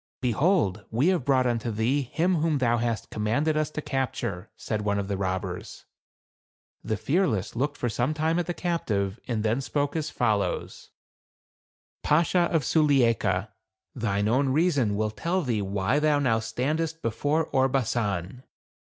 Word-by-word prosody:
" - - -80
Behold, 125 - +1
we 125 +10 +2
have 180 -7 +1
brought 130 -2 +3
unto 120 -1 0
thee 115 +6 +1
him 170 +7 0
whom 155 -1 +1
thou 120 -3 +2
hast 115 -3 -2
commanded 130 +9 0
us 155 -1 0
to 155 0 -5
capture," 120 -7 -3
said 110 -2 -3
one 100 -1 0
of 100 -1 -2
the 100 - -1
robbers. 95 -1 -4 1.0
The 110 - -2
Fearless 125 - 0
looked 145 +4 -1
for 125 - -1
some 120 +6 -1
time 160 +2 +1
at 175 - -2
the 175 - -1
captive, 110 - -1
and 115 -4 -1
then 110 +4 +1
spoke 145 +2 -1
as 155 -2 -1
follows: 110 -4 -1 0.6
" - - -70
Bashaw 170 +3 +3
of 160 -4 +1
Sulieika, 120 - +2 0.4
thine 105 -4 -1
own 130 +5 +2
reason 140 - +2
will 110 +1 0
tell 175 +10 -1
thee 115 -6 0
why 100 +7 0
thou 150 -1 +3
now 120 -6 +2
stand 130 +7 -2
est 165 0 -3
before 145 +8 0
Orbasan." 120 -6 0
125 Hz, 160 wpm, -26 LUFS, 110-150 Hz, 1.0 s, brought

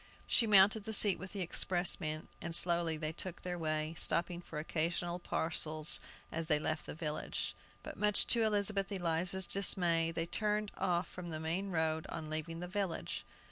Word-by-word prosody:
She 230 - +1
mounted 205 +1 +4
the 220 - -5
seat 200 -4 +6
with 185 +3 -10
the 200 - -5
expressman, 175 -3 +1
and 170 -1 -2
slowly 170 -2 +8
they 155 0 -4
took 175 +2 -7
their 180 -1 -4
way, 155 0 -3
stopping 175 +1 +1
for 165 - -10
occasional 170 +3 -3
parcels 155 -2 -1 0.3
as 165 0 -4
they 150 -2 +2
left 155 +1 -4
the - - -7
village. 155 -1 -5 0.3
But - - -9
much 210 -1 +3
to 235 - +1
Elizabeth 205 -2 0
Eliza's 180 0 +1
dismay, 175 -4 +3
they 165 0 -3
turned 210 +3 -2
off 175 -1 -1
from 180 -1 -9
the 155 -1 -5
main 170 +5 -3
road 160 -2 -2
on 155 -2 -7
leaving 160 +2 -5
the 180 - -6
village. 190 -2 -4
170 Hz, 175 wpm, -33 LUFS, 160-190 Hz, 0.3 s, slowly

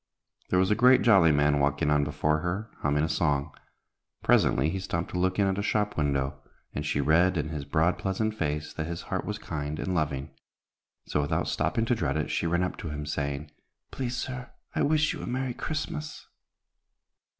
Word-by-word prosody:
There 90 - +2
was 95 +2 +3
a 105 - +1
great 125 +1 +7
jolly 95 -8 +6
man 75 0 +3
walking 70 +2 +1
on 75 -1 +3
before 75 +1 0
her, 95 +7 -3
humming 75 0 +1
a - - +2
song. 75 -4 0 0.7
Presently 65 +4 +4
he 95 +4 -2
stopped 85 -2 -3
to 90 - -2
look 95 +1 +1
in 100 - +3
at 95 0 0
a - - +1
shop 105 0 0
window, 70 -2 -1 0.3
and 75 - -3
she 75 - -1
read 85 +5 +3
in 75 -1 -1
his 75 -3 -4
broad, 85 +4 +1
pleasant 105 +3 -1
face 75 -6 -2
that 80 - -3
his 85 0 -5
heart - - -1
was - - -3
kind 75 0 -4
and 95 - -2
loving. 70 -4 -1 0.7
So, 75 - 0
without 70 - -1
stopping 115 -2 0
to 125 - +2
dread 80 - 0
it, 75 - -2
she 85 - 0
ran 85 +2 +1
up 90 - -3
to 80 - -5
him, 75 0 -4
saying, 70 0 -3 0.4
"Please, 125 -2 -3
sir, 125 0 -5 0.2
I - - 0
wish 155 +1 +3
you - - -7
a - - -6
merry 130 0 -2
Christmas." 155 +3 -4
80 Hz, 200 wpm, -28 LUFS, 75-105 Hz, 0.7 s, great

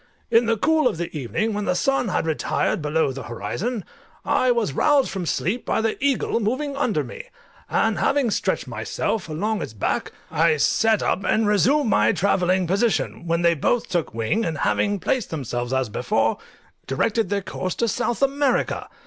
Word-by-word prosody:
In 230 0 +4
the 230 -1 +2
cool 310 +4 +3
of 215 - -1
the 170 -1 -5
evening, 155 - -1
when 205 0 -2
the 180 - +1
sun 270 +4 +1
had 180 - 0
retired 160 +1 0
below 150 -1 +1
the 135 +1 -6
horizon, 165 - -4 0.4
I 255 - +2
was 235 - +1
roused 285 - +3
from 185 -4 -4
sleep 185 - -1
by - - 0
the 225 +3 -1
eagle 275 -4 +1
moving 260 +6 -1
under 285 - 0
me; - - -9 0.4
and - - +1
having 275 -5 +2
stretched - - -1
myself 210 -7 -3
along 205 +8 -1
its - - -5
back, 105 - -2 0.2
I 160 -1 +3
sat 220 +8 +2
up, 195 - 0
and 220 +2 +2
reassumed 235 +6 +3
my 105 +1 +4
travelling 185 -1 +2
position, 195 -1 0
when 170 +1 +1
they 170 0 +5
both 220 +10 0
took 175 - -1
wing, 115 - -1
and 160 -6 -2
having 205 +5 +1
placed 215 +5 -1
themselves 120 -5 -3
as 130 -1 +1
before, 110 0 0 0.5
directed 220 - 0
their 200 -1 -1
course 185 0 -4
to 235 - 0
South 240 +4 -1
America. 275 0 +1
200 Hz, 180 wpm, -23 LUFS, 160-235 Hz, 0.5 s, they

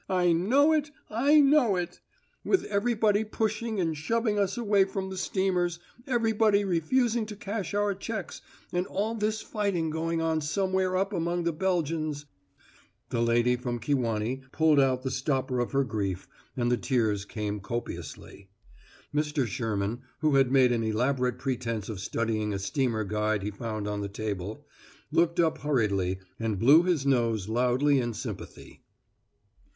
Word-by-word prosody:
I 180 -2 +3
know 255 - +4
it! 305 -2 +1 0.2
I 280 +8 +4
know 275 -7 +5
it! 175 -1 -4 0.4
With 385 - +2
everybody 215 0 +1
pushing 220 0 -2
and 165 -3 0
shoving 215 +7 0
us 200 +3 0
away 205 -4 +3
from 190 0 -4
the - - -5
steamers 180 -2 0 0.3
everybody 220 -4 +2
refusing 220 +6 +1
to 210 - -7
cash 200 -1 -4
our 205 0 +1
checks, 215 +3 -6 0.3
and 180 +1 0
all 210 +4 -1
this 220 0 -1
fighting 195 -7 -1
going 165 +1 -1
on 160 -1 0
somewhere 185 +4 0
up 195 +2 0
among 175 0 -1
the 170 0 0
Belgians 155 -4 -1 0.4
" - - -31
The 115 - 0
lady 120 +1 +3
from 125 -1 -3
Kewanee 120 -1 -1
pulled 155 -2 +4
out 130 -2 +2
the 130 - -2
stopper 130 -1 -1
of 120 - -1
her 140 0 +2
grief, 100 -6 -3 0.3
and 120 -1 +1
the 125 - +3
tears 110 -7 0
came 105 0 -4
copiously. 95 -2 -7 0.6
Mr. 150 -2 0
Sherman, 110 +1 -2 0.2
who 155 -2 +2
had 135 -2 +4
made 130 -2 +5
an 120 -1 +1
elaborate 125 +3 0
pretense 115 -6 -3
of 105 -4 -5
studying 110 0 -1
a - - -1
steamer 110 +3 -1
guide 105 0 -1
he 105 - -2
found 110 -1 -4
on 105 0 -2
the 100 - -4
table, 105 +5 -5 0.5
looked 170 +2 +2
up 160 -2 +2
hurriedly 100 -10 0 0.2
and 110 -3 -1
blew 140 - +7
his 175 -6 0
nose 115 -7 +1
loudly 125 +5 +2
in 120 -2 -2
sympathy. - - -8
150 Hz, 155 wpm, -28 LUFS, 115-195 Hz, 0.6 s, blew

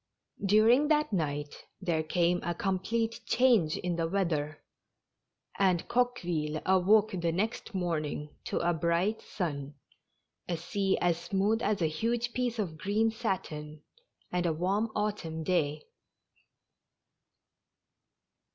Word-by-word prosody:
D 200 +1 +3
uring 245 +7 +5
that 300 -5 +2
night 145 -4 -2 0.2
there 170 -4 0
came 175 +2 +1
a 175 0 -2
complete 220 +5 -1
change 235 -11 +3
in 175 -1 -2
the 165 -1 0
weather, 165 -5 -1 1.0
and 185 -3 +2
Coqueville 175 -11 0
awoke 200 +3 +4
the 170 -3 -1
next 210 +4 -2
morning 155 -4 -2
to - - -2
a 175 - +3
bright 170 +6 0
sun, 145 -6 -4 0.7
a 170 - 0
sea 195 +4 0
as 170 -1 +1
smooth 205 +3 +1
as 205 -6 +1
a - - +4
huge 230 +9 -1
piece 245 -2 -1
of 170 -8 -3
green 215 +5 +1
satin, 155 -9 -4 0.5
and 180 -1 0
a 165 - +1
warm 195 +7 0
autumn 195 -7 -2
day. 150 -3 0
180 Hz, 125 wpm, -30 LUFS, 160-215 Hz, 1.0 s, uring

